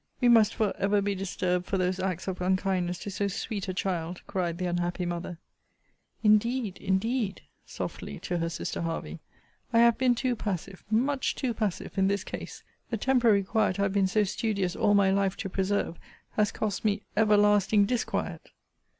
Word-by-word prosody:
We 245 - +4
must 225 -2 +5
for 215 -3 +1
ever 200 +1 +2
be 200 0 0
disturbed 180 -2 -1
for 195 - 0
those 185 0 0
acts 185 -1 -2
of 185 -1 -3
unkindness 185 -1 0
to 200 - -5
so 200 +1 -1
sweet 200 +1 -4
a 185 - -2
child, 175 -2 -2
cried 175 -3 -2
the 185 - -2
unhappy 175 0 -1
mother! 175 0 -4 0.9
Indeed! 215 0 +2
indeed! 200 +2 0 0.3
[softly - - -6
to 175 -1 -2
her 165 0 -1
sister 165 - -4
Hervey,] 165 - -4 0.5
I - - +2
have 235 0 +5
been 255 -2 +4
too 250 0 0
passive, 195 -3 -4
much 260 +5 +1
too 255 -3 -1
passive 210 -3 -3
in 190 - +4
this 200 -1 0
case! - - -7 0.3
The 230 - -1
temporary 235 -4 +3
quiet 205 -1 +1
I - - +2
have 195 -1 0
been 195 -2 +3
so 210 +3 +2
studious 200 -2 -1
all 205 - +3
my 195 -1 +4
life 195 -1 +1
to 195 - -4
preserve, 190 -2 -1 0.3
has 210 -1 +1
cost 210 -2 -3
me 205 -1 +1
everlasting 210 -1 +4
disquiet! 245 +3 -2
200 Hz, 175 wpm, -28 LUFS, 185-215 Hz, 0.9 s, must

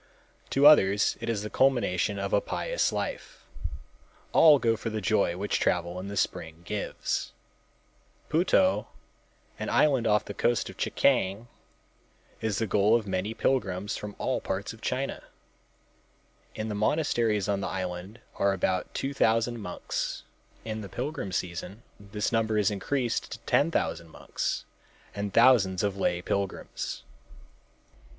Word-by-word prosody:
To 140 +1 +3
others 105 -9 +6
it - - -3
is 105 -3 -1
the 105 - -4
culmination 110 -7 +2
of 100 0 -3
a 100 - +4
pious - - -1
life. - - -5 0.9
All 155 -3 +7
go 115 -3 +2
for 115 +1 -4
the 110 -1 -3
joy 95 -3 +1
which 100 +2 -1
travel 85 +2 0
in 95 - -6
the 100 0 -5
spring 80 -2 -2
gives. 105 +1 -3 0.9
Puto, 185 - +3 0.7
an - - -3
island 135 -6 +3
off 105 0 +3
the 100 - -6
coast 120 +3 0
of - - -17
Chekiang, 100 +5 +1 0.9
is 110 -3 -1
the 115 - 0
goal 105 +2 +3
of 115 -3 0
many 100 +3 -2
pilgrims 100 -5 0
from 105 -1 -7
all - - -1
parts - - -3
of - - -15
China. - - -2 1.3
In, 110 - -3
the 110 - -3
monasteries 110 -3 +1
on 100 -1 0
the - - -2
island 95 +4 -5 0.2
are 100 0 +2
about 95 -1 -1
two 135 +1 -2
thousand 115 -1 +2
monks. 90 -4 -4 0.4
In 110 -1 -4
the 100 - -8
pilgrim 135 -6 -4
season 90 +5 -4 0.2
this 100 +1 -3
number 110 -1 +1
is 105 -1 +3
increased 120 +4 -2
to - - -8
ten 145 - +3
thousand 85 - -2
monks - - -3 0.5
and 100 0 -3
thousands 110 -7 +5
of 100 -1 0
lay 90 -2 0
pilgrims. 100 -1 -3
105 Hz, 145 wpm, -28 LUFS, 95-120 Hz, 1.3 s, All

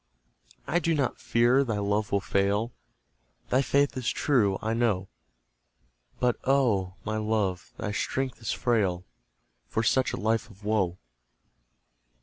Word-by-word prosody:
I 165 +5 +1
do 165 -1 +1
not 140 -4 -1
fear 120 +4 +3
thy 115 -5 -2
love 105 +1 0
will 100 - +2
fail; 100 +4 0 0.8
Thy 130 - +3
faith 140 +2 +2
is 125 -3 -1
true, 105 -10 +2
I 110 +1 -1
know; 110 -5 0 1.1
But, 125 -1 +2
oh, 110 -9 +2
my 110 0 -1
love! 105 -4 -1
thy 105 - -3
strength 130 +5 -2
is 115 - -2
frail 95 -7 0 0.6
For 110 - -1
such 130 +3 +2
a - - -3
life 110 +1 0
of 100 -1 -17
woe. 95 -5 +1
110 Hz, 135 wpm, -27 LUFS, 100-125 Hz, 1.1 s, fear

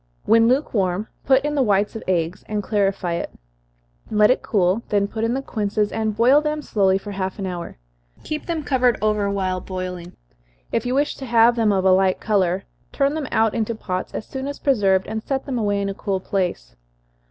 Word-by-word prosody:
When 230 0 +5
lukewarm, 210 -7 0 0.2
put 265 +1 +4
in 295 - -1
the 285 - +1
whites 205 -2 +1
of 225 - -5
eggs, 175 -1 -1
and 210 -1 -2
clarify 195 -4 0
it 170 - -3 0.8
let 210 +1 +4
it - - +1
cool, 190 +1 +1
then 205 -2 +2
put 220 +2 -4
in 230 +2 +1
the 270 - -3
quinces, 210 -3 -1
and 220 -1 -1
boil 260 +6 +5
them 300 0 -2
slowly 195 -5 +2
for 205 +1 -8
half 190 -1 -3
an 195 - -4
hour. 175 - -6 0.5
Keep 305 -1 -5
them 330 -3 -2
covered 250 -4 +2
over 210 -1 +1
while 185 -2 -1
boiling, 180 -2 -6 0.6
if - - -1
you 250 - 0
wish 290 +2 +1
to 270 - -7
have 235 0 +5
them 225 -3 +2
of 190 -1 +1
a 190 - +6
light 185 0 +3
color. 195 -3 +1 0.3
Turn 280 +1 +1
them 305 -3 -3
out 220 -1 +2
into 230 0 -1
pots 185 -4 -4
as - - -4
soon 265 0 -5
as 285 - -5
preserved, 195 -8 +2
and 220 +1 -4
set 270 +3 -3
them 260 -4 -2
away 205 -2 0
in 200 - -1
a 195 - -2
cool 195 -1 -2
place. 180 - -3
210 Hz, 210 wpm, -22 LUFS, 190-245 Hz, 0.8 s, a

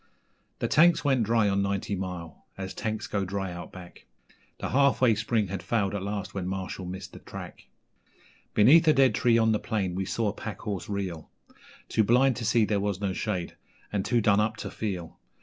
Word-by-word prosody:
The - - -1
tanks 165 0 +4
went 135 -3 +3
dry 115 -1 +3
on 100 0 +1
Ninety 100 0 -1
Mile, 90 -4 -6
as 95 0 -5
tanks 110 -2 -3
go 100 -1 -2
dry 95 0 -3
out 85 0 -8
back, 90 -1 -13 0.5
The - - -4
Half 140 -2 +3
Way 125 -3 +5
Spring 110 -1 0
had 95 -1 -4
failed 100 0 0
at 100 - -2
last 100 0 -4
when 95 -2 -3
Marshall 95 -1 -4
missed 95 0 -7
the - - -10
track; - - -10 0.9
Beneath 150 +10 +6
a 155 - +7
dead 135 -2 +4
tree 120 -2 +3
on 110 -1 +3
the 105 - +1
plain 100 -6 -2
we 95 +1 -2
saw 110 +2 0
a - - -4
pack 105 -3 -7
horse 100 -3 -4
reel 95 -6 -4 0.6
Too 110 - +2
blind 125 +4 +4
to 120 - -4
see 115 0 +3
there 105 -1 0
was 100 -1 -1
no 100 -2 -1
shade, 90 -4 -3 0.4
and 100 -2 0
too 120 +2 +1
done 105 -1 +4
up 110 +1 0
to - - -6
feel. 90 -6 -5
100 Hz, 205 wpm, -27 LUFS, 95-115 Hz, 0.9 s, a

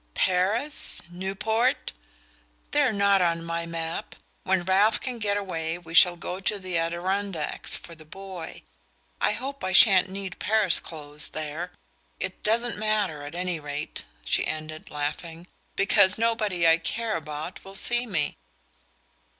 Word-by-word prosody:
"Paris? 200 +11 +1
Newport? 210 - 0 0.8
They're 285 -4 +3
not 200 -2 +3
on 170 -1 +1
my 170 0 -3
map! 165 0 -4 0.3
When 190 -1 +2
Ralph 200 +4 +4
can 250 -2 -5
get 205 -2 0
away 165 -4 -3
we 165 -2 -11
shall 175 +1 +7
go 180 +2 -5
to 205 +2 0
the 185 -2 -5
Adirondacks 175 +1 0
for 170 - -12
the 160 -1 -13
boy. 185 0 -9 0.6
I - - +3
hope 275 +1 -5
I 185 - -1
shan't 185 -1 +7
need 195 -1 -4
Paris 215 -4 +3
clothes 150 -2 -8
there! 155 +3 -5 0.5
It - - -4
doesn't 230 +1 +1
matter, 210 -8 0
at 145 +3 -8
any 180 -2 -1
rate," 145 0 -5 0.2
she - - +2
ended, 155 0 -6
laughing, 160 +3 -4 0.3
"because 195 -1 +4
nobody 215 -7 +1
I 165 +1 +6
care 225 +6 -1
about 155 +2 -6
will 195 0 -11
see 240 +4 +2
me." 155 -8 -1
185 Hz, 140 wpm, -26 LUFS, 165-205 Hz, 0.8 s, shall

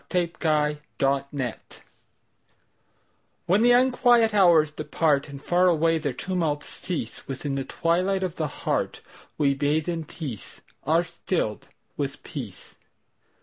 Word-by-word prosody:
The 175 -2 0
Hour 150 -2 +3
of 150 0 -11 0.3
Twilight 130 -6 -6 1.6
WHEN 185 +5 +3
the 240 +1 +5
unquiet 245 -3 +4
hours 170 -6 +5
departAnd 145 -3 0
far 180 +1 +3
away 165 -1 +3
their 145 -2 -2
tumults 160 0 -2
cease, 165 -11 -5
Within 135 +1 -4
the 135 0 -1
twilight 185 +3 0
of 180 -3 -3
the 155 - 0
heartWe 140 0 -2
bathe 150 +2 +1
in 165 -2 -2
peace, 135 - -8 0.2
are 165 +4 +3
stilled 170 - -3 0.3
with - - -4
peace. - - -8
160 Hz, 120 wpm, -25 LUFS, 145-180 Hz, 1.6 s, the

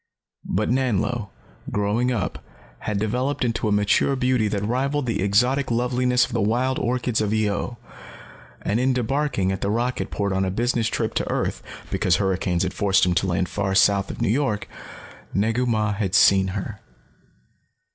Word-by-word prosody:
But 105 +5 0
Nanlo, 120 -4 0 0.4
growing 105 +5 0
up, 110 -6 -3 0.4
had 105 -2 -3
developed 125 +7 -1
into 115 -2 -1
a - - 0
mature 105 +6 +2
beauty 125 -4 +1
that 100 -1 -2
rivaled 135 +5 0
the 115 -5 -1
exotic 125 +8 +2
loveliness 125 +1 +2
of - - -11
the 115 - 0
wild 125 +5 +1
orchids 120 -2 0
of 105 -1 0
Io. 110 +2 -1 0.9
And 105 +3 0
in 130 0 +2
debarking 125 -5 0
at 95 - -4
the 100 - -1
rocket 120 +4 -1
port 100 -1 -2
on 95 0 +1
a 95 - 0
business 115 +3 0
trip - - -2
to - - -2
earth, - - -2 0.3
because 90 - +2
hurricanes 95 -2 0
had 95 - -2
forced 100 -2 +3
him 90 - +1
to 90 +2 +1
land 90 0 0
far 95 +1 -2
south 100 0 +3
of - - -4
New - - +1
York, 110 -4 0 0.7
Negu 115 +5 +1
Mah 110 -2 +1
had 100 -2 -1
seen 95 -1 +5
her. 100 +2 -5
110 Hz, 170 wpm, -23 LUFS, 100-125 Hz, 0.9 s, seen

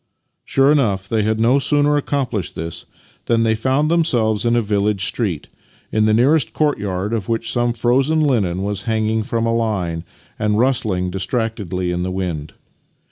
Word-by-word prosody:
Sure 135 +1 +3
enough, 100 -10 +1
they 110 0 0
had 110 +1 0
no 120 +5 +4
sooner 145 +1 +2
accomplished 135 - -2
this 80 0 -6 0.4
than 115 -1 +2
they 110 -1 +2
found 135 +7 +1
themselves 120 -11 +1
in 120 0 +2
a - - +4
village 105 -2 0
street, 95 - -2 0.4
in 110 0 +2
the 110 - +3
nearest 140 +6 +3
courtyard 105 -9 -1
of 110 -3 -3
which 115 0 -1
some 120 -1 +1
frozen 130 +6 +1
linen 105 - +1
was 100 0 -3
hanging 110 0 +1
from 115 0 -2
a 115 - +1
line 95 -8 -1 0.4
and 105 -1 +1
rustling 110 -8 0
distractedly 95 -3 -2
in 90 0 -2
the 90 - -2
wind. 90 -5 -4
110 Hz, 165 wpm, -19 LUFS, 95-125 Hz, 0.4 s, no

